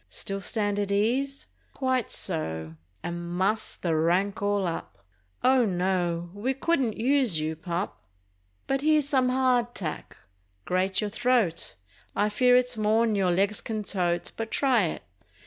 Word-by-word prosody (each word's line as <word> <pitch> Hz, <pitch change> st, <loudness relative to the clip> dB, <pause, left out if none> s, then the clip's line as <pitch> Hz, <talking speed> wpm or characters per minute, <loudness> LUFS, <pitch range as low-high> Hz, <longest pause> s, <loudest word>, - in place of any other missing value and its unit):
Still 195 Hz, 0 st, -4 dB
stand 205 Hz, -1 st, 0 dB
at 200 Hz, -1 st, -1 dB
ease? 255 Hz, +7 st, 0 dB, 0.3 s
Quite 260 Hz, -3 st, 0 dB
so—and 95 Hz, -, -5 dB
muss 205 Hz, +4 st, 0 dB
the 165 Hz, -3 st, -1 dB
rank 180 Hz, +6 st, +1 dB
all 205 Hz, -1 st, +1 dB
up— 100 Hz, -, -5 dB, 0.4 s
Oh 255 Hz, 0 st, +5 dB
no, 175 Hz, -3 st, 0 dB
we 240 Hz, +7 st, -2 dB
couldn't 270 Hz, -6 st, 0 dB
use 250 Hz, -, +2 dB
you, 155 Hz, +1 st, -2 dB
pup! 175 Hz, +4 st, -4 dB, 0.6 s
But 270 Hz, 0 st, 0 dB
here's 305 Hz, -1 st, +3 dB
some 260 Hz, -3 st, +2 dB
"hard 250 Hz, -2 st, +2 dB
tack." 155 Hz, -6 st, -5 dB, 0.5 s
Grate 185 Hz, +2 st, +1 dB
your 210 Hz, -1 st, -2 dB
throat! 225 Hz, -, +1 dB, 0.4 s
I 210 Hz, +1 st, +2 dB
fear 250 Hz, +4 st, +4 dB
it's 250 Hz, -2 st, +1 dB
more'n 220 Hz, +1 st, +3 dB
your 195 Hz, -3 st, +2 dB
legs 195 Hz, +4 st, +1 dB
can 215 Hz, -2 st, -3 dB
tote, 175 Hz, -4 st, -1 dB
But 225 Hz, 0 st, -4 dB
try 250 Hz, -8 st, +3 dB
it. 160 Hz, -, -4 dB
205 Hz, 145 wpm, -27 LUFS, 175-250 Hz, 0.6 s, Oh